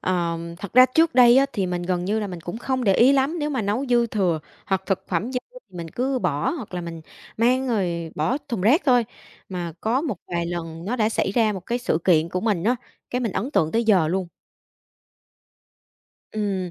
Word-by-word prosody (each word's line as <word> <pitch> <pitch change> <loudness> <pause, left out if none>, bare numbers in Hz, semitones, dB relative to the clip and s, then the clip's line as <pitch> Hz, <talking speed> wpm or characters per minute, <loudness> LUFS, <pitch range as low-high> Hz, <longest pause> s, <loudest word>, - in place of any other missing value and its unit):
Ờ, 170 -2 -1 0.2
thật 200 -2 -8
ra 255 +1 +8
trước 325 +5 +2
đây 245 -1 +7
á, 275 +1 +5
thì 195 -2 -1
mình 180 -1 -2
gần 180 0 -1
như 210 +4 0
là 210 - -2
mình 180 -3 -7
cũng 175 +7 -6
không 260 0 -2
để 195 -3 +4
ý 255 +4 +6
lắm, 280 +5 +1
nếu 295 0 -1
mà 260 -6 -1
nấu 215 +7 -1
dư 240 -1 +3
thừa 185 -8 0 0.3
hoặc 190 -1 0
thực 195 -2 -1
phẩm 195 +8 -1
dư, 250 - 0 0.3
mình 170 -2 -7
cứ 260 +5 -1
bỏ 160 - 0
hoặc 245 - -6
là 180 - -2
mình 170 -1 -7 0.4
mang 255 +3 +2
rồi 175 -7 -1
bỏ 160 - 0
thùng 235 -8 -2
rác 255 - +4
thôi, 245 -3 +5 0.4
mà 175 -3 -4
có 235 +4 +1
một 285 - -3
vài 170 -1 -2
lần 165 -1 -5
nó 230 +6 -2
đã 220 -2 +2
xảy 220 - 0
ra 220 -1 +2
một 190 - -5
cái 240 +1 -1
sự 200 -9 0
kiện 165 -3 +4
của 180 +1 -2
mình 205 -6 0
á, 245 +3 +2 0.3
cái 250 - -1
mình 230 -6 -1
ấn 235 +10 -2
tượng 160 - +1
tới 230 +1 +1
giờ 185 -8 +4
luôn. 185 0 -1 2.0
Ừm. 195 -4 -2
205 Hz, 225 wpm, -23 LUFS, 175-245 Hz, 2.0 s, ra